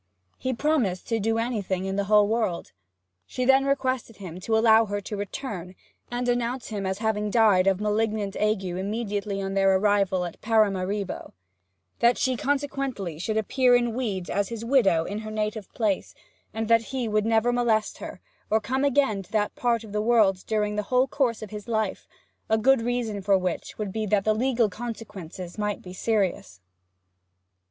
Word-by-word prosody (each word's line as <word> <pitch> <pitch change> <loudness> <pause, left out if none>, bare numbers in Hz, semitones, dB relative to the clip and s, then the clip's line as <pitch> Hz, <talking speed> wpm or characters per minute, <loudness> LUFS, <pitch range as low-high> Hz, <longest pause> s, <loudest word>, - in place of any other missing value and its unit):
He 260 - -1
promised 245 - 0
to 225 -1 +1
do 225 +2 0
anything 205 -6 -2
in 195 0 -2
the 200 0 0
whole 210 0 +5
world. 215 -6 -1 0.6
She 255 - -2
then 270 +1 +5
requested 260 -4 -1
him 180 -3 -8
to 220 +4 0
allow 225 0 +5
her 205 0 -2
to 210 - -6
return, 200 -3 -5 0.3
and 245 0 -2
announce 245 +1 -1
him 200 -3 -3
as 190 0 -2
having 210 -1 -1
died 205 -4 +4
of 195 -1 +3
malignant 210 -1 -1
ague 210 -2 +1
immediately 200 +2 -3
on 195 0 -3
their 195 -1 +4
arrival 195 -2 +2
at 175 - -8
Paramaribo; 205 -3 0 0.7
that 235 +1 +4
she 260 - +1
should 250 - -3
consequently 275 - -2
appear 245 +4 +3
in 240 -1 +1
weeds 205 -8 -3
as 200 -1 -1
his 230 -1 -5
widow 225 -11 +3
in 205 +5 -4
her 215 0 -7
native 215 -1 -3
place; 210 -5 -1 0.4
and 220 0 -3
that 230 0 +5
he 255 -1 -3
would 215 0 +1
never 225 +2 +3
molest 230 -3 +1
her, - - -8 0.3
or 220 - +3
come 260 +5 -1
again 270 -7 +2
to 185 - -17
that 210 -1 0
part 235 -2 0
of 215 - -11
the 210 0 -1
world 215 -5 +3
during 210 -1 0
the - - +2
whole 255 0 +4
course 245 -6 0
of 215 - -9
his 210 0 -7
life 220 -3 -2 0.4
a 220 - +4
good 260 +3 +4
reason 230 -3 -2
for 195 0 +3
which 185 -2 -3
would 210 -3 -3
be 215 +1 -2
that 200 0 +2
the 215 - +4
legal 240 0 +2
consequences 205 -5 -7
might 210 -1 -1
be 180 - -9
serious. 185 - -1
215 Hz, 180 wpm, -26 LUFS, 195-235 Hz, 0.7 s, whole